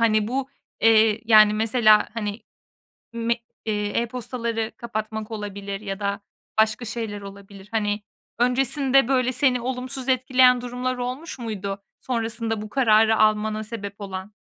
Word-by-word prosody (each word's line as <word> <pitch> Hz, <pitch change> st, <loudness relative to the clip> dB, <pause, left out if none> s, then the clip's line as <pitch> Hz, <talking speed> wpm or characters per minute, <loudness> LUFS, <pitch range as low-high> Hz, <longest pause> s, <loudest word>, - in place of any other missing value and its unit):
Hani 215 Hz, -2 st, +3 dB
bu, 265 Hz, +2 st, -2 dB, 0.3 s
eee, 220 Hz, -1 st, +5 dB
yani, 215 Hz, -2 st, +6 dB
mesela, 215 Hz, 0 st, +4 dB
hani, 210 Hz, -1 st, -4 dB, 0.7 s
me 235 Hz, +1 st, 0 dB, 0.3 s
eee, 210 Hz, -2 st, -1 dB
e-postaları 230 Hz, -1 st, -3 dB
kapatmak 220 Hz, -1 st, -5 dB
olabilir 200 Hz, -2 st, -5 dB
ya 195 Hz, -1 st, -5 dB
da 200 Hz, 0 st, -2 dB, 0.4 s
başka 220 Hz, +2 st, 0 dB
şeyler 220 Hz, -2 st, -5 dB
olabilir. 200 Hz, 0 st, -12 dB
Hani, 210 Hz, -2 st, -1 dB, 0.4 s
öncesinde 265 Hz, +1 st, +3 dB
böyle 255 Hz, -1 st, +2 dB
seni 255 Hz, -1 st, +2 dB
olumsuz 260 Hz, +1 st, -4 dB
etkileyen 255 Hz, -1 st, +4 dB
durumlar 250 Hz, +1 st, -3 dB
olmuş 255 Hz, +5 st, -5 dB
muydu? 200 Hz, -4 st, -4 dB, 0.2 s
Sonrasında 225 Hz, -2 st, -2 dB
bu 215 Hz, -, -7 dB
kararı 220 Hz, -3 st, +4 dB
almana 215 Hz, 0 st, +2 dB
sebep 205 Hz, -2 st, -7 dB
olan. 195 Hz, +1 st, -7 dB
225 Hz, 130 wpm, -24 LUFS, 210-250 Hz, 0.7 s, yani